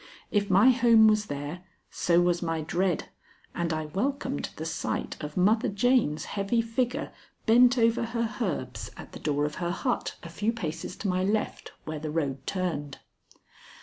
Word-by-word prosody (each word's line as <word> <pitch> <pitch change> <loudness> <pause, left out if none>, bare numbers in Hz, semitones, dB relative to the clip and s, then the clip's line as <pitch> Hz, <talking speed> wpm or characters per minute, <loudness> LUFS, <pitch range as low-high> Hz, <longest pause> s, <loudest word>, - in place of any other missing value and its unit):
If 205 -1 +1
my 195 +8 +6
home 230 -3 +6
was 215 -1 +3
there, 145 +5 -5 0.3
so 175 0 +3
was 175 -1 +2
my 165 -2 -1
dread, 175 +2 -1 0.4
and 170 -1 -1
I 155 -1 -2
welcomed 255 - -2
the - - -5
sight - - -3
of 150 +2 -6
Mother 210 +5 +3
Jane's 205 - +2
heavy 200 +4 -1
figure 250 +5 -1 0.3
bent 245 +3 +6
over 230 0 +3
her 230 0 -2
herbs 180 -8 -3
at - - -10
the - - -9
door 145 -1 0
of 150 - -3
her 175 - 0
hut, 240 +8 -2
a 170 - -7
few 205 +7 -1
paces 170 -5 -5
to 205 - -4
my 185 0 +1
left, 210 +3 -2
where 155 -1 -4
the 155 +1 -4
road 140 -4 -2
turned. 165 -7 -2
190 Hz, 170 wpm, -28 LUFS, 160-230 Hz, 0.4 s, my